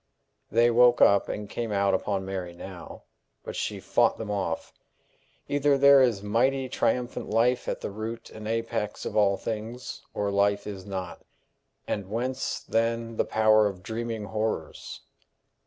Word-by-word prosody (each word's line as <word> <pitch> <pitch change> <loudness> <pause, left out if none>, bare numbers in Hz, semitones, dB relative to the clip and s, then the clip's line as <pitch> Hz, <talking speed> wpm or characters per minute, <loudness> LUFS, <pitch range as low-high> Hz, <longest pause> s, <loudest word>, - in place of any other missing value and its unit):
They 120 +1 +4
woke 120 +1 +5
up 100 -1 +5
and 105 0 -4
came 115 +1 -4
out 100 -1 +2
upon 95 0 -1
Mary 95 -2 -4
now, 90 +1 -10 0.4
but - - -7
she - - -3
fought - - +2
them 110 -2 -5
off. 95 -5 -3 0.7
Either 145 0 +2
there 140 0 +7
is 115 -6 +2
mighty, 130 +6 +1
triumphant 125 -1 -1
life 120 +3 +2
at - - -3
the - - -4
root 110 +3 -6
and 110 0 -8
apex 115 -2 -2
of - - -4
all 100 -2 +3
things, 115 +3 -5
or 100 -1 -1
life 100 0 +2
is 100 -2 -7
not 95 -3 -5 0.7
and 100 -3 -3
whence, 125 +4 -2
then, 115 0 -1
the - - +2
power 110 -1 +4
of 95 -2 -7
dreaming 115 0 -4
horrors? 105 -6 -4
110 Hz, 155 wpm, -27 LUFS, 100-115 Hz, 0.7 s, there